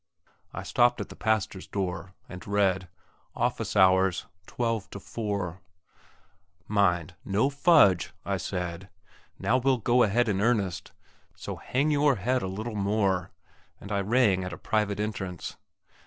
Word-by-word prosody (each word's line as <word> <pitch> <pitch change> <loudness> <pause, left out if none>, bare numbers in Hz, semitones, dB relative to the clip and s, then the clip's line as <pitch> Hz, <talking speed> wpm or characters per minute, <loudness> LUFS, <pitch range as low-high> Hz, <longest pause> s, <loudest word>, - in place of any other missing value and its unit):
I - - -6
stopped 120 0 +3
at - - -5
the - - -10
pastor's 105 -4 -1
door, 95 -2 -4
and 90 -1 -10
read, 95 -2 +1 0.5
"Office - - -1
hours, 95 -1 +4 0.2
12 115 -4 -2
to 100 - -8
4." 100 -4 -4 1.1
Mind, 90 -5 +1
no 105 +8 +1
fudge, 140 - +4
I - - 0
said; 90 +1 -4 0.5
now 125 - +2
we'll 130 0 +2
go 120 +2 +2
ahead 120 +3 +3
in 100 -2 0
earnest! 105 -5 0 0.4
So - - -6
hang 140 +4 0
your 145 -2 +3
head 125 +5 0
a - - -3
little 110 +5 -5
more, 100 -3 0 0.5
and 100 - -10
I 100 -1 +1
rang 105 -3 +3
at 90 - -4
the 85 - -7
private 105 -2 -1
entrance. 95 -5 -4
100 Hz, 140 wpm, -27 LUFS, 95-115 Hz, 1.1 s, hours